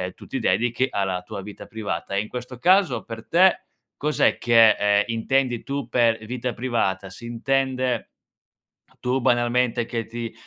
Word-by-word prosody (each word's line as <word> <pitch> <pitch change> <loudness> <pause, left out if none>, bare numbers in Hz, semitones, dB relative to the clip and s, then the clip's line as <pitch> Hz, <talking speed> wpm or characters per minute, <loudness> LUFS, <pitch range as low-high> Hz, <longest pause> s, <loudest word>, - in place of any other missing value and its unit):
tu - - -13
ti - - -3
dedichi 120 +2 +1
alla 95 -2 -1
tua 95 +2 -7
vita 105 +1 -10
privata; 100 -5 -5
e - - +2
in 105 - -3
questo 125 +1 -7
caso 180 -6 +3
per 115 -1 -8
te 185 +3 +4 0.3
cos'è 150 +1 +1
che, 115 -2 +6
ehm, 105 0 +2
intendi 120 +1 0
tu 140 0 -4
per 115 -2 +2
vita 125 +2 -3
privata? 100 -6 -1
Si 105 +6 -13
intende 130 0 -1 0.9
tu 125 +2 -1
banalmente 120 0 +1
che 115 -1 -4
ti 115 0 -6
120 Hz, 155 wpm, -23 LUFS, 110-130 Hz, 0.9 s, che